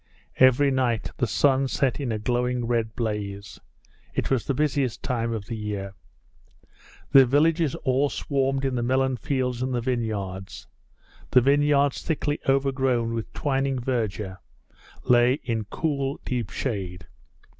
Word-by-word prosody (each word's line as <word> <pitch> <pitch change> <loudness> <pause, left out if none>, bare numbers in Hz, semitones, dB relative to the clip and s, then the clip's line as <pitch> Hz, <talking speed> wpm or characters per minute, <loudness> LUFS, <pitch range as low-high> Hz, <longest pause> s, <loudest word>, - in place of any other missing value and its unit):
Every 130 +2 +5
night 125 -4 0
the 125 - +1
sun 135 +4 +2
set 130 0 0
in 135 -5 -2
a 110 - -1
glowing 125 +2 -1
red 115 -2 -1
blaze. 100 -3 -4 0.6
It - - -1
was 130 -4 +1
the 140 - 0
busiest 140 -4 0
time 115 -3 -1
of 110 -3 -4
the 115 - -5
year. 105 -3 -4 1.2
The 135 -1 +9
villagers 155 +3 +2
all 135 +2 +1
swarmed 135 -1 -1
in 135 - 0
the 120 - -1
melon 130 +2 +1
fields 125 -2 -2
and 130 0 -1
the - - +1
vineyards. 105 -6 -3 0.6
The 125 - +5
vineyards 140 +1 +3
thickly 150 -2 -1
overgrown 135 -4 +1
with 115 -2 -4
twining 135 -1 0
verdure 110 -6 -2 0.6
lay 120 +1 +4
in 115 -3 -2
cool, 140 +2 -2
deep 120 -5 -2
shade. 95 -8 -4
125 Hz, 140 wpm, -25 LUFS, 115-135 Hz, 1.2 s, The